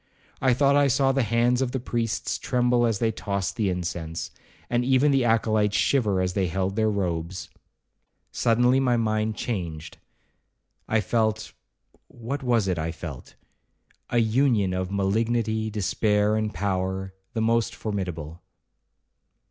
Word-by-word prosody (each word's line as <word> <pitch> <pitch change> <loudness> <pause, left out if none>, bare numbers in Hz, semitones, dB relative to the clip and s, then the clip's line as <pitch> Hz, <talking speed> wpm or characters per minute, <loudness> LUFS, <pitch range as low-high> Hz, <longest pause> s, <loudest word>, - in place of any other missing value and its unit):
I 130 -2 +3
thought 140 +1 +3
I 145 0 +4
saw 135 +1 +3
the 135 0 +1
hands 120 +2 +2
of 130 -1 -1
the 130 - -1
priests 115 -2 -2
tremble 125 -1 +2
as 115 -3 0
they 115 +2 +1
tossed 100 -3 -3
the 110 -5 0
incense, 85 -2 -4 0.4
and 120 0 0
even 135 +3 +3
the 135 -2 +3
acolytes 110 -2 +2
shiver 105 -9 +2
as 90 -1 -1
they 95 -1 0
held 95 +3 -2
their 110 0 +2
robes. 90 -3 -3 0.8
Suddenly 120 +3 +3
my 125 -3 +2
mind 110 -1 0
changed: 85 -10 -5 0.9
I 110 0 +2
felt—what 110 +4 -4
was 120 -6 +1
it 90 -3 0
I 80 +1 -2
felt?—a 80 - -10
union 115 -4 +2
of 95 0 -2
malignity, 110 +2 0
despair, 105 +1 +1
and 110 -1 -1
power, 95 -1 -2 0.2
the 115 - -1
most 115 0 +1
formidable. 90 -6 -5
110 Hz, 135 wpm, -25 LUFS, 95-120 Hz, 0.9 s, I